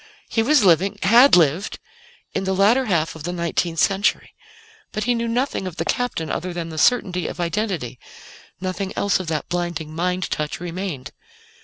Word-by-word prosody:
He 225 Hz, -, +1 dB
was 275 Hz, +1 st, +4 dB
living 195 Hz, +3 st, +3 dB
had 240 Hz, +7 st, +7 dB
lived 170 Hz, +3 st, +2 dB, 0.6 s
in -, -, -1 dB
the 190 Hz, 0 st, 0 dB
latter 220 Hz, +7 st, +4 dB
half 165 Hz, -7 st, 0 dB
of 160 Hz, -, -10 dB
the 175 Hz, +4 st, -3 dB
nineteenth 170 Hz, -1 st, -1 dB
century. 195 Hz, +5 st, +1 dB, 0.6 s
But 215 Hz, -, -3 dB
he 245 Hz, -, +2 dB
knew 235 Hz, 0 st, -1 dB
nothing 240 Hz, -4 st, -1 dB
of 180 Hz, -, -7 dB
the -, -, -3 dB
Captain 245 Hz, -11 st, -1 dB
other 180 Hz, 0 st, -3 dB
than 170 Hz, -1 st, -4 dB
the 160 Hz, -1 st, -5 dB
certainty 180 Hz, -7 st, +2 dB
of -, -, -7 dB
identity; 170 Hz, -, -2 dB, 0.6 s
nothing 185 Hz, +1 st, -3 dB
else 200 Hz, -2 st, +1 dB
of 185 Hz, -, -6 dB
that 155 Hz, -3 st, -2 dB
blinding 170 Hz, -3 st, -3 dB
mind 180 Hz, +2 st, -1 dB
touch 150 Hz, -1 st, -2 dB
remained. 175 Hz, -6 st, -5 dB
180 Hz, 175 wpm, -22 LUFS, 165-205 Hz, 0.6 s, had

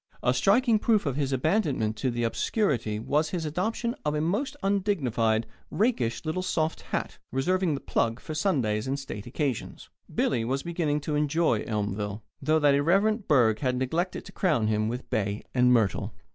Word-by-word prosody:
A 125 Hz, -, +3 dB
striking 220 Hz, -, +3 dB
proof 215 Hz, -3 st, +2 dB
of 140 Hz, -3 st, -1 dB
his 140 Hz, -2 st, -1 dB
abandonment 135 Hz, -, +1 dB
to 120 Hz, 0 st, -1 dB
obscurity 120 Hz, -, 0 dB
was 150 Hz, +8 st, 0 dB
his 170 Hz, -3 st, -3 dB
adoption 220 Hz, +9 st, -1 dB
of 150 Hz, 0 st, 0 dB
a -, -, 0 dB
most 205 Hz, -, -1 dB
undignified, 130 Hz, -, +1 dB, 0.2 s
rakish, 165 Hz, -, 0 dB
little 160 Hz, +4 st, -1 dB
soft 160 Hz, -3 st, -1 dB
hat, -, -, -4 dB
reserving 175 Hz, +5 st, +1 dB
the 140 Hz, -, -6 dB
"plug" 115 Hz, +1 st, 0 dB
for 155 Hz, -, -7 dB
Sundays 130 Hz, -, 0 dB
and 135 Hz, +1 st, -1 dB
state 125 Hz, -7 st, -7 dB
occasions. 130 Hz, -1 st, -3 dB, 0.2 s
Billy 115 Hz, -, +1 dB
was 135 Hz, +4 st, -1 dB
beginning 160 Hz, -4 st, -1 dB
to 150 Hz, -, -3 dB
enjoy 150 Hz, -5 st, +1 dB
Elmville, 105 Hz, -1 st, -3 dB, 0.2 s
though 155 Hz, +3 st, +3 dB
that 145 Hz, -2 st, +4 dB
irreverent 195 Hz, +9 st, +2 dB
burgh 120 Hz, -7 st, +4 dB
had 130 Hz, -2 st, 0 dB
neglected 160 Hz, +9 st, -2 dB
to 195 Hz, -, -10 dB
crown 155 Hz, -, +1 dB
him 110 Hz, 0 st, +1 dB
with 120 Hz, +3 st, -4 dB
bay 100 Hz, -1 st, -1 dB
and 125 Hz, -1 st, +4 dB
myrtle. 110 Hz, -6 st, +1 dB
145 Hz, 170 wpm, -27 LUFS, 115-175 Hz, 0.2 s, that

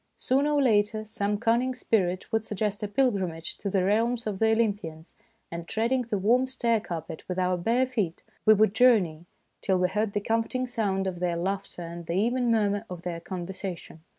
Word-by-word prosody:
Sooner 280 Hz, +3 st, +1 dB
or 285 Hz, -, +3 dB
later 215 Hz, -2 st, +2 dB
some 205 Hz, -1 st, -1 dB
cunning 235 Hz, +4 st, +1 dB
spirit 185 Hz, -7 st, 0 dB
would 225 Hz, -2 st, +1 dB
suggest 210 Hz, -1 st, -2 dB
a 210 Hz, -, -1 dB
pilgrimage 195 Hz, -8 st, -1 dB
to 200 Hz, -, -3 dB
the 190 Hz, -1 st, +1 dB
realms 230 Hz, +5 st, +1 dB
of 205 Hz, -3 st, -3 dB
the 220 Hz, 0 st, +4 dB
Olympians, 200 Hz, -8 st, -1 dB, 0.4 s
and 170 Hz, 0 st, -6 dB
treading 235 Hz, +4 st, +1 dB
the 230 Hz, -3 st, -2 dB
warm 240 Hz, +7 st, +3 dB
stair 235 Hz, -3 st, +1 dB
carpet 165 Hz, -6 st, -6 dB
with 180 Hz, -, -2 dB
our 185 Hz, 0 st, +2 dB
bare 230 Hz, +9 st, +2 dB
feet, 210 Hz, -10 st, -2 dB, 0.2 s
we 215 Hz, -, +7 dB
would 215 Hz, -1 st, +3 dB
journey 195 Hz, -10 st, +3 dB, 0.3 s
till 190 Hz, -2 st, +1 dB
we 180 Hz, 0 st, +2 dB
heard 210 Hz, +1 st, -1 dB
the -, -, +1 dB
comforting 230 Hz, +4 st, -1 dB
sound 200 Hz, -6 st, -1 dB
of 185 Hz, -2 st, -3 dB
their 175 Hz, -1 st, 0 dB
laughter 190 Hz, 0 st, -3 dB
and 170 Hz, 0 st, -8 dB
the 170 Hz, -, -2 dB
even 240 Hz, +5 st, +1 dB
murmur 205 Hz, -2 st, +2 dB
of 175 Hz, -2 st, -7 dB
their 170 Hz, -2 st, -4 dB
conversation. 180 Hz, -2 st, -6 dB
205 Hz, 190 wpm, -27 LUFS, 180-230 Hz, 0.4 s, we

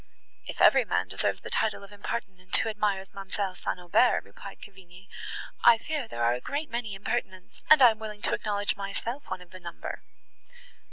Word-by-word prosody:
"If -, -, -6 dB
every -, -, +7 dB
man -, -, 0 dB
deserves -, -, -1 dB
the -, -, -7 dB
title 220 Hz, -2 st, 0 dB
of 200 Hz, -, -13 dB
impertinent, 195 Hz, -3 st, -3 dB
who 225 Hz, -, +1 dB
admires 205 Hz, -3 st, -1 dB
ma'amselle 195 Hz, -1 st, -3 dB
St. -, -, -3 dB
Aubert," 180 Hz, +8 st, +3 dB
replied -, -, -11 dB
Cavigni, 190 Hz, -1 st, -14 dB, 0.6 s
"I 235 Hz, -1 st, +8 dB
fear 290 Hz, +1 st, -3 dB
there 120 Hz, -, -3 dB
are 120 Hz, +1 st, +4 dB
a 125 Hz, -, -4 dB
great 295 Hz, +2 st, -3 dB
many 230 Hz, -4 st, -3 dB
impertinents, 190 Hz, -2 st, -4 dB
and 310 Hz, -3 st, +9 dB
I 245 Hz, -, +10 dB
am 220 Hz, -, -8 dB
willing 210 Hz, -1 st, -7 dB
to -, -, +1 dB
acknowledge 205 Hz, -1 st, 0 dB
myself 215 Hz, +7 st, -4 dB
one 180 Hz, -, -4 dB
of 175 Hz, -, -22 dB
the 185 Hz, -, -10 dB
number." 170 Hz, -1 st, -7 dB
200 Hz, 185 wpm, -28 LUFS, 185-225 Hz, 0.6 s, I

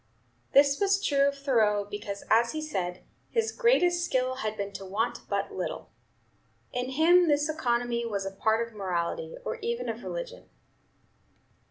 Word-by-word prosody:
This 280 Hz, 0 st, +5 dB
was 395 Hz, -1 st, +3 dB
true 280 Hz, -8 st, +3 dB
of 280 Hz, 0 st, -1 dB
Thoreau, 220 Hz, -7 st, +2 dB
because, 205 Hz, -1 st, -6 dB
as 235 Hz, +1 st, +3 dB
he 310 Hz, -, -3 dB
said, 180 Hz, -12 st, -3 dB, 0.3 s
his 455 Hz, -1 st, 0 dB
"greatest 360 Hz, -8 st, +3 dB
skill 255 Hz, -5 st, 0 dB
had 215 Hz, -3 st, -3 dB
been 200 Hz, 0 st, -3 dB
to 195 Hz, -, -7 dB
want 210 Hz, +5 st, -2 dB
but -, -, -1 dB
little." -, -, -5 dB, 0.8 s
In 250 Hz, +1 st, -2 dB
him 335 Hz, +6 st, +5 dB
this 295 Hz, 0 st, +2 dB
economy 240 Hz, -6 st, 0 dB
was 200 Hz, -3 st, -2 dB
a 195 Hz, -, -3 dB
part 220 Hz, +3 st, +1 dB
of 230 Hz, -, -17 dB
morality, 190 Hz, -, -3 dB
or 475 Hz, -, -3 dB
even 470 Hz, +2 st, -3 dB
of -, -, -4 dB
religion. -, -, -6 dB
255 Hz, 160 wpm, -28 LUFS, 210-345 Hz, 0.8 s, This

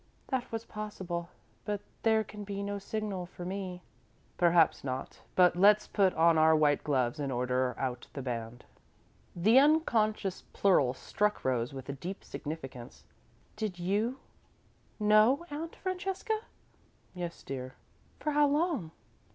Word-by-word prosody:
"That 255 Hz, -2 st, -2 dB
was 225 Hz, 0 st, -4 dB
possible 185 Hz, -6 st, -5 dB, 0.3 s
but 205 Hz, -1 st, -2 dB, 0.2 s
there 220 Hz, -1 st, +3 dB
can 210 Hz, 0 st, -9 dB
be 200 Hz, 0 st, -4 dB
no 200 Hz, 0 st, -3 dB
signal 200 Hz, -3 st, -4 dB
for 175 Hz, -1 st, -9 dB
me." 185 Hz, -1 st, -5 dB, 0.5 s
"Perhaps 170 Hz, -2 st, +4 dB
not, 130 Hz, -1 st, -5 dB
but 180 Hz, -1 st, +5 dB
let's 205 Hz, +3 st, +5 dB
put 195 Hz, -3 st, +2 dB
on 165 Hz, 0 st, +5 dB
our 160 Hz, 0 st, +6 dB
white 150 Hz, -2 st, +3 dB
gloves 135 Hz, -1 st, 0 dB
and 140 Hz, -2 st, -2 dB
order 125 Hz, 0 st, 0 dB
out 125 Hz, -2 st, -3 dB
the 140 Hz, -, -5 dB
band." 120 Hz, -1 st, -5 dB, 0.7 s
The 215 Hz, +9 st, +6 dB
unconscious 225 Hz, -, +2 dB
plural 140 Hz, -10 st, +3 dB
struck 210 Hz, +9 st, -1 dB
Rose 125 Hz, -2 st, 0 dB
with 135 Hz, 0 st, -7 dB
deep 190 Hz, +5 st, -6 dB
significance. 135 Hz, -6 st, -7 dB, 0.5 s
"Did 215 Hz, -4 st, -3 dB
you 205 Hz, +8 st, 0 dB, 0.8 s
know, 215 Hz, +9 st, +5 dB
Aunt 320 Hz, +3 st, -5 dB
Francesca?" 385 Hz, +3 st, -2 dB, 0.7 s
"Yes, 175 Hz, -2 st, -6 dB
dear." 130 Hz, -1 st, -6 dB, 0.4 s
"For 300 Hz, -, -1 dB
how 295 Hz, 0 st, +4 dB
long?" 290 Hz, -, 0 dB
185 Hz, 135 wpm, -31 LUFS, 145-215 Hz, 0.8 s, our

